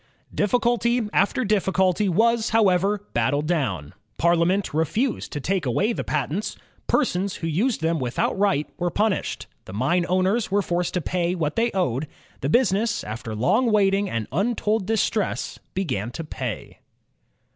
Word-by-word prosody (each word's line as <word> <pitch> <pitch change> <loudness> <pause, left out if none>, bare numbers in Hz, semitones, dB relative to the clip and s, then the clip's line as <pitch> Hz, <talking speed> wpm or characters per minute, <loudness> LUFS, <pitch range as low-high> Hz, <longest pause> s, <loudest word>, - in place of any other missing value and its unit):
Difficulty 235 +1 +1
after 205 +6 +2
difficulty 190 -1 +2
was, 225 +5 +2
however, 200 -1 +2
battled 145 +6 +1
down. 110 - -1 0.2
Parliament 170 +3 +2
refused 210 - -1
to 145 - -3
take 180 0 -1
away 205 - +1
the - - -3
patents. 150 +7 -2 0.3
Persons 190 +2 +1
who - - -6
used 200 - 0
them 165 0 +1
without 125 -1 -1
right 190 -7 +1
were 175 0 +1
punished. 210 +2 -1 0.2
The 95 - -9
mine 170 - +1
owners 185 +5 +1
were 200 +1 +2
forced 175 0 -1
to 180 - +1
pay 175 +2 -1
what 155 -4 -2
they 235 +1 +2
owed. 150 -6 0 0.3
The 135 - -2
busi 235 +1 +3
ness, 210 +2 0
after 110 0 -6
long 220 - +2
waiting 200 -1 +3
and 115 -2 -3
imtold 210 - 0
distress, 220 -1 -1 0.2
began 130 - -2
to 165 - -5
pay. 130 - -6
185 Hz, 150 wpm, -24 LUFS, 150-210 Hz, 0.3 s, busi